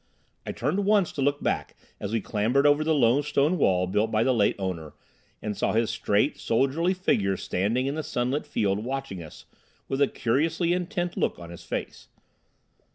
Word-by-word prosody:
I - - -1
turned 200 +2 -1
once 200 -3 +3
to 140 - -4
look 145 +1 +1
back - - -1 0.2
as 100 - -4
we 115 -1 0
clambered 115 +8 +1
over 145 +1 +4
the 160 0 +2
low 130 0 +4
stone 150 +4 +1
wall 90 -7 +3
built 105 +4 0
by 110 0 +2
the 130 - +3
late 105 -4 +2
owner, 90 -6 -4 0.5
and 105 -1 -2
saw - - 0
his 115 0 +1
straight, 110 +4 +1
soldierly 140 +10 +1
figure 100 - +1
standing 110 +11 -1
in 140 - -1
the 155 - -2
sunlit 135 0 -2
field 105 -6 0
watching 130 -7 -4
us 80 - -12 0.4
with 135 +1 -2
a 140 - +5
curiously 160 +9 0
intent 180 -1 -2
look - - 0
on 85 -1 -10
his 85 0 -10
face. 80 - -5
130 Hz, 185 wpm, -26 LUFS, 105-150 Hz, 0.5 s, a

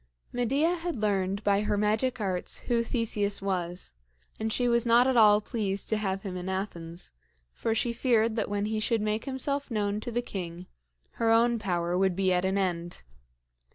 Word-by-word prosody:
Medea 275 +9 +1
had 345 0 -3
learned 200 -2 0
by 200 0 +3
her 210 -1 0
magic 215 +5 +1
arts 185 -4 -2
who 235 -2 +1
Theseus 215 -4 0
was, 180 - -3 0.5
and 220 0 -1
she 245 +2 +1
was 235 -1 +3
not 235 +1 +5
at 260 -1 +2
all 210 -2 +6
pleased 200 -3 -2
to 220 - +2
have 195 -2 -2
him 190 -3 -5
in 180 +1 -4
Athens; 175 - -5 0.4
for 225 -1 -1
she 235 +1 +1
feared 230 -2 +2
that 220 -3 -1
when 205 0 -1
he 215 0 -1
should 225 +1 +1
make 215 +1 -1
himself 280 +1 -2
known 210 -2 -1
to 240 - -6
the 240 +1 -1
king, 180 -4 -6 0.6
her 230 - +3
own 230 +1 +4
power 175 -4 -1
would 190 -1 +2
be 190 -1 +2
at 180 +1 +1
an 190 +1 +1
end. 175 - -2
210 Hz, 190 wpm, -28 LUFS, 190-235 Hz, 0.6 s, all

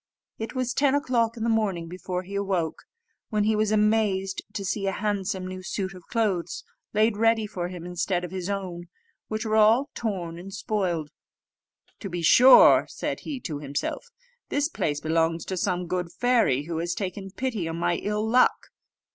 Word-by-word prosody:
It 225 +3 -5
was 255 -1 -1
ten 280 0 +3
o'clock 240 -5 +1
in 225 - -3
the - - +1
morning 205 -7 0
before 180 +1 -4
he 195 +2 -10
awoke, 190 -5 -2 0.4
when 215 -2 +1
he 215 +1 +2
was 215 0 +1
amazed 210 -3 +1
to 200 -2 -4
see 195 +1 -1
a - - +2
handsome 195 -1 -2
new 185 0 -6
suit 190 0 -3
of 180 -2 -14
clothes 195 -8 -1 0.3
laid 215 0 +2
ready 225 0 +3
for 185 -4 -4
him, 180 -1 -8
instead 180 0 -1
of 175 - -5
his 185 0 -4
own, 180 -3 -4 0.4
which 215 +1 -3
were 220 0 +1
all 230 +7 +4
torn 175 -7 -4
and 195 +2 -8
spoiled. 175 -8 -2 0.9
"To 195 - -6
be 175 -1 -4
sure," 250 +10 +8
said - - -4
he 285 -4 -5
to 150 -8 -4
himself, 145 - -4 0.4
"this 290 +2 +1
place 145 - -1
belongs 165 +1 0
to 190 - -3
some 180 -1 -1
good 180 0 -3
fairy, 235 - +2
who 165 +1 -4
has 170 +1 -2
taken 195 0 -4
pity 225 -5 -3
on 165 - -3
my 175 0 +1
ill 210 +1 -2
luck." 250 +3 +3
195 Hz, 180 wpm, -26 LUFS, 175-220 Hz, 0.9 s, sure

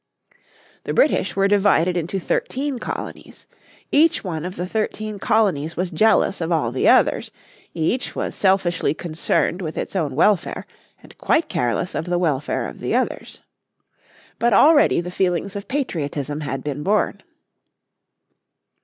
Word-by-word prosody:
The - - -3
British - - +2
were 195 0 +3
divided 195 -4 +3
into 175 +3 -2
thirteen 265 +8 -2
colonies. - - -7 0.5
Each 315 +3 +3
one 165 -4 -4
of 180 +1 -5
the 180 - -3
thirteen 215 +1 -3
colonies 180 -9 +1
was 180 +1 -2
jealous 205 +1 +2
of 165 +1 -2
all 150 -9 +1
the 130 - +2
others; - - +3 0.5
each 170 +10 -1
was - - -3
selfishly 185 -6 +1
concerned 170 +2 -1
with 160 -3 -5
its - - -4
own 150 -8 -1
welfare 190 +4 +1 0.4
and - - -16
quite 330 - +1
careless 125 +8 -1
of 160 - -3
the 175 0 0
welfare 150 -5 -1
of - - -10
the - - -1
others. - - -3 1.0
But 235 -1 +2
already 290 - +5
the 180 +1 -7
feelings 180 +1 -1
of 200 0 -6
patriotism 150 - -3
had 135 -2 -4
been 145 -1 -4
born. 205 +7 0
180 Hz, 145 wpm, -21 LUFS, 155-205 Hz, 1.0 s, already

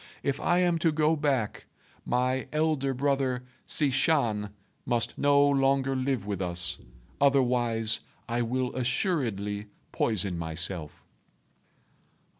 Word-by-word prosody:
If 140 -1 -1
I 175 -1 +2
am 175 -2 +2
to 165 -1 +2
go 155 +1 +2
back, 140 -8 -1 0.4
my 125 +2 0
elder 150 -3 +1
brother 135 -1 0 0.2
Hsi 145 -3 +2
Shan 115 -8 +1 0.3
must 120 -1 0
no 145 0 +4
longer 135 -1 +2
live 130 -5 -1
with 100 -2 -3
us; 90 0 -1 0.4
otherwise, 120 -5 +2 0.3
I 120 +1 -1
will 125 +2 -1
assuredly 120 - -1 0.2
poison 95 -5 0
myself." 80 0 -3
130 Hz, 110 wpm, -28 LUFS, 105-140 Hz, 0.4 s, no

